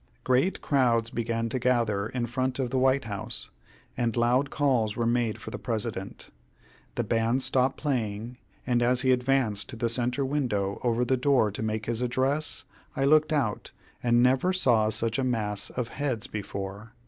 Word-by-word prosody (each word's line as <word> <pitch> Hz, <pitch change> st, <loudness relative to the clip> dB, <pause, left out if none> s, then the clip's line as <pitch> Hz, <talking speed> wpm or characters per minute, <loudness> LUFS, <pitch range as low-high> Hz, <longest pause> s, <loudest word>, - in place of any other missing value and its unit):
Great 130 Hz, +9 st, +1 dB
crowds 120 Hz, -5 st, +2 dB
began 115 Hz, 0 st, -1 dB
to 125 Hz, +3 st, -2 dB
gather 115 Hz, -5 st, +1 dB
in 125 Hz, 0 st, -2 dB
front 130 Hz, +2 st, -2 dB
of 130 Hz, -3 st, -2 dB
the 130 Hz, -, +1 dB
White 130 Hz, +1 st, +3 dB
House, 100 Hz, -3 st, -5 dB, 0.4 s
and 120 Hz, -1 st, -1 dB
loud 125 Hz, +4 st, +2 dB
calls 125 Hz, -9 st, +1 dB
were 120 Hz, -, -1 dB
made 115 Hz, -2 st, 0 dB
for -, -, -8 dB
the -, -, -6 dB
President. 110 Hz, -4 st, -4 dB, 0.6 s
The 120 Hz, -, 0 dB
band 115 Hz, +3 st, +1 dB
stopped 130 Hz, 0 st, +2 dB
playing, 120 Hz, -4 st, -2 dB, 0.3 s
and 120 Hz, -1 st, +1 dB
as 125 Hz, +1 st, +2 dB
he 130 Hz, -1 st, +3 dB
advanced 125 Hz, -5 st, +1 dB
to 130 Hz, -, -6 dB
the 115 Hz, +1 st, -1 dB
centre 125 Hz, +3 st, +1 dB
window 115 Hz, -9 st, -1 dB
over 120 Hz, 0 st, +1 dB
the 130 Hz, +2 st, +1 dB
door 125 Hz, -5 st, +3 dB
to 100 Hz, -, -5 dB
make 110 Hz, 0 st, -2 dB
his 120 Hz, 0 st, -1 dB
address, 130 Hz, +5 st, 0 dB, 0.3 s
I 135 Hz, -, +1 dB
looked 155 Hz, +2 st, +4 dB
out, 135 Hz, -9 st, -1 dB, 0.3 s
and 120 Hz, 0 st, +3 dB
never 135 Hz, +9 st, +3 dB
saw 120 Hz, -12 st, +3 dB
such 115 Hz, +2 st, -1 dB
a -, -, +1 dB
mass 105 Hz, -5 st, -1 dB
of 125 Hz, -2 st, -4 dB
heads 130 Hz, -5 st, -2 dB
before. 100 Hz, +1 st, -6 dB
120 Hz, 175 wpm, -27 LUFS, 110-130 Hz, 0.6 s, looked